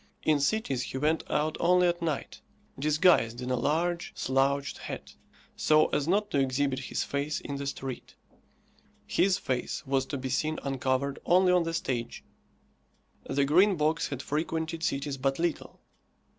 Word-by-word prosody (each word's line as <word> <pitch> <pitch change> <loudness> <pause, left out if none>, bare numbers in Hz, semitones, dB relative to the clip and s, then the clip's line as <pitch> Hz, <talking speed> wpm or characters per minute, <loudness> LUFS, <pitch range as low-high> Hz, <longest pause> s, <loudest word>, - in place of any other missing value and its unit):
In 155 -2 +3
cities 145 - 0
he 130 - -5
went 155 +4 +1
out 155 +1 0
only 180 +1 +4
at 175 0 -1
night, 160 -4 -3 0.4
disguised 150 -5 +3
in 125 0 -4
a - - +2
large, 170 +6 -1
slouched 140 +1 0
hat, - - -7 0.4
so 155 0 +4
as 145 0 -1
not 205 +4 +1
to 140 - +2
exhibit 135 0 0
his - - -1
face 145 +2 -2
in 140 - -5
the 140 0 -4
street. 135 -2 -6 0.9
His 190 -1 +2
face 130 +4 -3
was 135 0 0
to 140 - -3
be 130 0 -4
seen 155 +4 0
uncovered 135 0 -1
only 180 +1 +4
on 180 0 +4
the 165 - -2
stage. 120 -8 -3 1.1
The 140 0 +2
Green 185 +7 +5
Box 155 +2 +1
had 140 -2 -5
frequented 160 +2 -2
cities 140 -2 -2
but 135 +1 0
little. 170 -1 -3
145 Hz, 155 wpm, -29 LUFS, 135-165 Hz, 1.1 s, Green